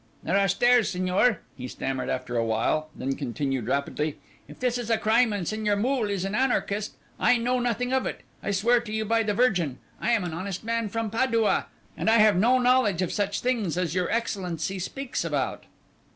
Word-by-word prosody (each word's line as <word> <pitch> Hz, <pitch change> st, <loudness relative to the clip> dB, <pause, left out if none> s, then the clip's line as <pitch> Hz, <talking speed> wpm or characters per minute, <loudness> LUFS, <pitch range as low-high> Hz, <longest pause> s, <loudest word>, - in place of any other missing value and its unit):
"There 180 Hz, -, 0 dB
are 200 Hz, 0 st, +4 dB
stairs, 240 Hz, +4 st, +4 dB
signor," 185 Hz, +4 st, +1 dB
he 125 Hz, -2 st, -6 dB
stammered 130 Hz, 0 st, -3 dB
after 125 Hz, -1 st, -3 dB
a 115 Hz, -, +2 dB
while, 115 Hz, +8 st, 0 dB
then 135 Hz, +1 st, -2 dB
continued 135 Hz, -3 st, -3 dB
rapidly: 140 Hz, +3 st, -1 dB, 0.3 s
"If -, -, -13 dB
this 250 Hz, -1 st, 0 dB
is 235 Hz, -2 st, -5 dB
a 225 Hz, -, +3 dB
crime 225 Hz, +2 st, +3 dB
and 195 Hz, -5 st, -3 dB
Signor 215 Hz, -1 st, 0 dB
Moole 235 Hz, +1 st, 0 dB
is 195 Hz, -2 st, -1 dB
an 195 Hz, -, -3 dB
anarchist, 215 Hz, -, 0 dB, 0.2 s
I 250 Hz, -, +4 dB
know 250 Hz, +2 st, 0 dB
nothing 245 Hz, +1 st, -1 dB
of 265 Hz, -, +1 dB
it, -, -, -5 dB, 0.2 s
I -, -, -4 dB
swear 220 Hz, +5 st, +3 dB
to 235 Hz, -2 st, -8 dB
you 220 Hz, 0 st, -1 dB
by 230 Hz, +1 st, +2 dB
the 210 Hz, -2 st, -1 dB
Virgin. 180 Hz, -, +1 dB, 0.2 s
I 240 Hz, -, +1 dB
am 220 Hz, -5 st, +2 dB
an 175 Hz, -2 st, -4 dB
honest 185 Hz, +3 st, -5 dB
man 230 Hz, -1 st, -1 dB
from 225 Hz, 0 st, -3 dB
Padua, 230 Hz, -2 st, +1 dB, 0.3 s
and -, -, 0 dB
I 225 Hz, -, +5 dB
have 215 Hz, -1 st, +5 dB
no 235 Hz, +8 st, +4 dB
knowledge 245 Hz, -7 st, +3 dB
of 180 Hz, -, -3 dB
such 205 Hz, -1 st, -1 dB
things 225 Hz, -10 st, 0 dB
as 175 Hz, -3 st, -1 dB
your 180 Hz, -1 st, 0 dB
Excellency 190 Hz, -5 st, -2 dB
speaks 270 Hz, +8 st, -4 dB
about." -, -, -2 dB
210 Hz, 205 wpm, -26 LUFS, 175-235 Hz, 0.3 s, I